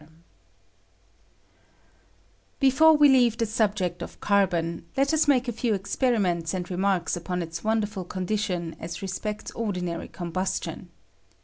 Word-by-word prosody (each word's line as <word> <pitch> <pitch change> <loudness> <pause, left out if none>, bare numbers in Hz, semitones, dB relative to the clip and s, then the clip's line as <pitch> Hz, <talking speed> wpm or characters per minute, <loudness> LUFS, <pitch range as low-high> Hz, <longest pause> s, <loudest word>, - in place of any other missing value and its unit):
Before 300 +4 +6
we 295 0 +7
leave 245 -4 +4
the 230 - +1
subject 210 -5 0
of - - -8
carbon, 175 -5 +1
let 275 +3 +2
us 315 -1 +3
make 260 -3 +3
a - - 0
few 230 -1 0
experiments 195 -5 0
and 180 0 -4
remarks 185 -1 0
upon 180 +1 -3
its 165 0 -7
wonderful 215 -3 -1
condition 185 -2 -2
as 170 +4 -6
respects 210 +3 -4
ordinary 180 -7 -3
com 175 -2 -7
bustion. 185 +2 -3
200 Hz, 125 wpm, -26 LUFS, 175-230 Hz, -, we